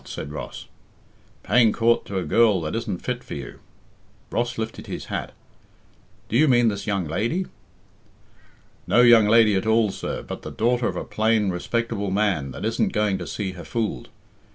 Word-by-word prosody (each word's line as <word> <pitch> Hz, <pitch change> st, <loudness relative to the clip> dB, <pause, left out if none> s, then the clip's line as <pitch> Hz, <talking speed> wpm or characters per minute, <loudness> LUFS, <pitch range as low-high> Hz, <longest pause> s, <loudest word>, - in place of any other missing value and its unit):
said 70 Hz, -, -7 dB
Ross. 75 Hz, -, -7 dB, 0.8 s
"Paying 120 Hz, -3 st, +4 dB
coort 115 Hz, +1 st, +2 dB
to 100 Hz, -, -4 dB
a 95 Hz, -, -1 dB
girl 110 Hz, -3 st, +3 dB
that 75 Hz, +3 st, -3 dB
isn't 110 Hz, -6 st, -4 dB
fit 125 Hz, 0 st, -3 dB
for -, -, -7 dB
you." 65 Hz, -4 st, -8 dB, 0.7 s
Ross 120 Hz, +1 st, -1 dB
lifted 110 Hz, 0 st, -5 dB
his -, -, -6 dB
hat, -, -, -3 dB, 1.0 s
"Do -, -, -3 dB
you 155 Hz, +6 st, +5 dB
mean 120 Hz, -3 st, +4 dB
this 100 Hz, -1 st, -5 dB
young 100 Hz, -4 st, 0 dB
lady?" 115 Hz, -, -1 dB, 1.4 s
"No 120 Hz, -, +5 dB
young 120 Hz, -3 st, +7 dB
lady 110 Hz, -1 st, +5 dB
at 95 Hz, +2 st, 0 dB
all, 110 Hz, -2 st, +3 dB
sir, -, -, -5 dB
but -, -, -7 dB
the -, -, -7 dB
daughter 120 Hz, +2 st, +1 dB
of -, -, -3 dB
a -, -, -3 dB
plain, 110 Hz, -2 st, +1 dB
respectable 105 Hz, +2 st, -2 dB
man 95 Hz, -8 st, 0 dB
that 70 Hz, +9 st, -6 dB
isn't 115 Hz, +1 st, 0 dB
going 105 Hz, -3 st, +1 dB
to 90 Hz, -, -6 dB
see 100 Hz, -3 st, -3 dB
her 90 Hz, -2 st, -10 dB
fooled. 110 Hz, -, -3 dB
110 Hz, 175 wpm, -23 LUFS, 95-115 Hz, 1.4 s, young